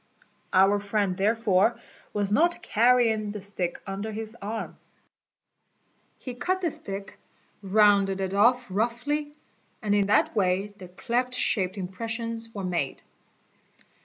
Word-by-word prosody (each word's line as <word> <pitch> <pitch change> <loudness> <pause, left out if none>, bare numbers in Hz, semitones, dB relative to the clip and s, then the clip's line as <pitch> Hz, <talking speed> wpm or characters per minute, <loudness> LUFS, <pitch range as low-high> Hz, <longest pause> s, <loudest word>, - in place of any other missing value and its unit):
Our 195 +2 +4
friend 200 -2 -1
therefore 210 +1 +2 0.3
was 205 -1 -1
not 340 +7 +2
carrying 225 -2 +3
the 210 0 -5
stick 185 -3 -2
under 200 +2 -4
his 220 +1 -5
arm. 220 +3 -5 1.4
He 250 - -7
cut 365 +10 -1
the 340 -4 0
stick, 195 -4 -7 0.4
rounded 200 -1 +3
it 190 0 -2
off 245 +5 +4
roughly, 245 +9 -2 0.4
and 210 -2 -1
in 200 -1 +2
that 205 - +2
way 195 +1 +1
the 185 - -9
cleft 245 +7 -2
shaped 190 -5 0
impressions" 225 +4 -3
were 200 -3 -6
made. 175 -7 -2
210 Hz, 125 wpm, -26 LUFS, 195-230 Hz, 1.4 s, Our